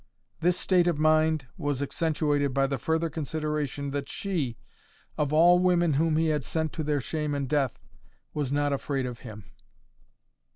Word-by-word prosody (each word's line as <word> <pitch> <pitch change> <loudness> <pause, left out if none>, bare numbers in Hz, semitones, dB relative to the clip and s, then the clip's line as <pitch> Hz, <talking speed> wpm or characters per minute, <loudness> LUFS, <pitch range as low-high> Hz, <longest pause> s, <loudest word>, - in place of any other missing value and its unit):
This 175 +2 +2
state 180 -2 +3
of 170 -4 +1
mind 155 -1 +3
was 145 -2 -1
accentuated 145 -2 0
by 135 0 +3
the 135 0 -2
further 160 +1 0
consideration 150 -2 -3
that 140 0 -4
she, 160 - -2 0.6
of 145 -2 -1
all 175 +3 +6
women 175 -3 +3
whom 155 +2 +2
he 160 0 +2
had 150 -3 0
sent 160 +5 -2
to 160 - -3
their 150 -1 0
shame 150 +2 -2
and 140 -1 -2
death, 135 -4 0 0.5
was 145 -3 -2
not 145 0 +1
afraid 135 -1 -2
of 125 -2 -6
him. 110 -3 -10
150 Hz, 165 wpm, -27 LUFS, 140-160 Hz, 0.6 s, all